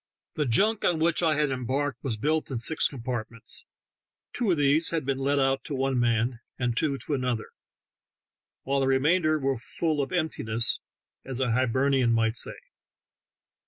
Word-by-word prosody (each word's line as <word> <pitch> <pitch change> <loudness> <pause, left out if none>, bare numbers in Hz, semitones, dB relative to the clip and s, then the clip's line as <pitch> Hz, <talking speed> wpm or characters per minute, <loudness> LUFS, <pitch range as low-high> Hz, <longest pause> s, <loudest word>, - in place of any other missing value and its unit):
The 150 -3 -1
junk 210 - +2
on 175 - +2
which 170 +2 +2
I 160 -3 +3
had 150 -2 +1
embarked 130 +1 -2
was 120 -5 -2
built 155 +7 0
in 130 - -2
six 150 +7 +2
compartments; 120 -3 -6 0.7
two 240 -4 0
of 175 - +3
these 145 +3 +3
had 165 -4 -1
been 135 0 -1
let 140 +1 +1
out 135 0 +2
to 145 - -3
one 135 -1 0
man 115 0 +1 0.2
and 125 -2 -1
two 140 +2 0
to 145 - -5
another, 125 -4 -2 1.1
while 140 +1 0
the 135 - +1
remainder 155 +4 +3
were 135 -4 -1
"full 155 +4 -1
of 135 - -3
emptiness," 120 -10 0 0.4
as 130 -1 -5
a 130 -2 +1
Hiber 130 +3 +2
nian 125 -4 +3
might 115 0 +2
say. - - -3
135 Hz, 170 wpm, -27 LUFS, 125-150 Hz, 1.1 s, I